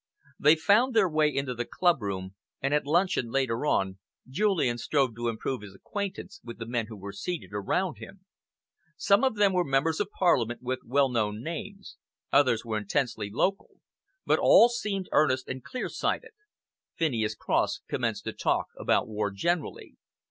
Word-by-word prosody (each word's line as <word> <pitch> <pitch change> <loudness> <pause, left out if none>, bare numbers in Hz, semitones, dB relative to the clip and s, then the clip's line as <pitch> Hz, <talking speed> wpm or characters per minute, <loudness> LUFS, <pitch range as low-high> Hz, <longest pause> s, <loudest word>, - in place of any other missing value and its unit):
'" - - -30
They 150 +2 +7
found 220 +10 +3
their 215 -4 +5
way 155 -2 +2
into 135 -3 -2
the 120 0 -3
clubroom, 100 - 0 0.3
and 135 +2 -1
at 150 -1 +1
luncheon, 170 -6 +1
later 130 +1 0
on, 95 -7 0 0.3
Julian 145 - +1
strove 135 -3 0
to 120 +1 -3
improve 115 +2 -3
his 100 -2 -11
acquaintance 200 - -6
with 120 0 -9
the 115 - -6
men 115 -1 -2
who 110 -1 -9
were 100 +1 -7
seated 130 - -5
around 155 - -1
him. 190 -1 -12 0.7
Some 200 +5 +3
of 260 -4 +2
them 205 -2 +3
were 180 -1 +2
Members 150 +3 +1
of 205 - -1
Parliament 125 - +1
with 130 +1 -2
well 140 +3 +2
known 110 -2 -1
names, 195 +5 -7 0.4
others 130 -5 +3
were 110 -2 -1
intensely 105 0 -2
local, 190 - -1 0.5
but - - +3
all 235 - +7
seemed 205 -5 -3
earnest 130 -4 +2
and 130 -1 -6
clear 255 - -4
sighted. - - -2 0.7
Phineas 115 -9 0
Cross - - 0
commenced - - -2
to - - -4
talk - - 0
about - - +1
war 105 -1 -2
generally. 145 - -3
135 Hz, 170 wpm, -28 LUFS, 115-180 Hz, 0.7 s, They